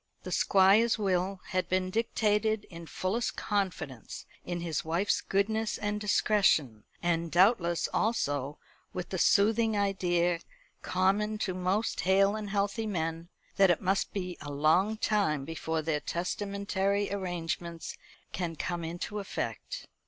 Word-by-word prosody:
The - - -6
Squire's 200 +4 +4
will 190 -2 0
had 185 0 -1
been 185 0 0
dictated 215 0 +1
in 170 -1 -9
fullest 195 +9 -2
confidence 175 - -3 0.2
in 175 -1 -4
his 165 -4 -2
wife's 170 +6 +1
goodness 220 +3 0
and 210 0 -2
discretion; 190 - +2 0.2
and 170 -1 0
doubtless 175 -2 +3
also 145 - 0 0.4
with 180 -1 -5
the 185 - -3
soothing 220 +3 +3
idea 175 -4 +1 0.4
common 200 +4 +1
to 185 - -2
most 185 +4 -1
hale 195 +2 +3
and 215 -2 -5
healthy 205 +2 -1
men, 165 -3 -3 0.3
that 195 -2 +6
it 175 - +3
must 195 +1 0
be 180 -3 -4
a 145 - -6
long 160 +9 +2
time 195 -11 +1
before 160 0 -3
their 155 -1 0
testamentary 200 +3 -1
arrangements 170 -3 -4 0.4
can 170 -2 -3
come 175 +2 -3
into 175 +5 -4
effect. - - -5
190 Hz, 130 wpm, -30 LUFS, 170-205 Hz, 0.4 s, that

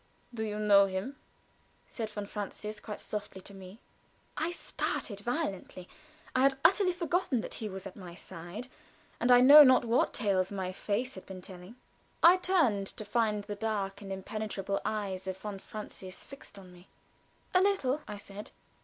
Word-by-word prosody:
"Do 220 -2 -3
you 210 -1 -3
know 200 -2 +6
him?" 190 +9 -4 0.7
said 225 -3 -5
von 205 -1 -5
Francius, 210 +1 -6
quite 210 -1 -7
softly, 205 -2 -5
to 200 - -12
me. 190 +2 -11 0.6
I 325 +2 -1
started 205 - -3
violently. 200 - -3 0.5
I 255 - +3
had 270 0 +4
utterly 380 +2 +5
forgotten 345 -7 0
that - - -6
he 220 -3 -4
was 190 0 -7
at 195 - -8
my 180 -3 -10
side, 175 +9 -8 0.5
and 240 +2 +3
I 245 0 +8
know 285 +4 +11
not 255 -3 +5
what 235 +1 +2
tales 195 -4 +1
my 190 -2 -3
face 215 +7 -2
had 185 - -10
been 185 -1 -9
telling. 185 +4 -9 0.5
I 350 +2 +9
turned 305 - +2
to 215 - -7
find 210 -1 +1
the 205 - -5
dark 205 -2 -3
and 195 -1 -8
impenetrable 195 0 -3
eyes 195 -3 -3
of 190 0 -3
von 200 0 -6
Francius 190 -3 -8
fixed 275 -7 -12
on 185 -2 -13
me. 180 +1 -17 0.7
"A 365 - +5
little," 310 -8 +1
I 205 - -6
said. 205 +1 -9
210 Hz, 170 wpm, -31 LUFS, 195-250 Hz, 0.7 s, know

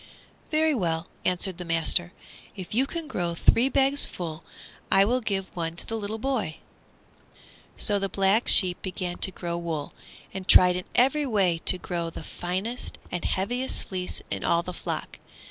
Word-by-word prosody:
"Very 315 0 +2
well," 170 - -1 0.2
answered 180 0 0
the - - -4
master; 165 +1 +1 0.4
"if 185 -1 -7
you 260 +5 +2
can 330 0 -5
grow 175 - -2
three 240 +9 +4
bags 275 +1 +2
full 160 -3 -3 0.5
I 195 0 +6
will 250 +4 +1
give 195 -4 -3
one 165 -1 -3
to - - -9
the 225 - -4
little 215 0 -4
boy." 235 -9 -2 1.2
So 205 -2 +2
the 195 0 -1
Black 195 +4 +2
Sheep 180 -2 +6
began 185 -2 -4
to - - +2
grow 175 -2 -5
wool, 160 -4 -4 0.4
and 190 -1 -6
tried 180 0 +7
in 180 - -4
every 275 +4 +3
way 190 -8 +1
to 185 - +5
grow 170 -2 -4
the 165 - -9
finest 190 +10 -4
and 175 - -3
heaviest 245 +8 0
fleece 185 -1 -4
in - - -3
all 170 0 +2
the 180 - -6
flock. - - -5
190 Hz, 170 wpm, -26 LUFS, 175-230 Hz, 1.2 s, tried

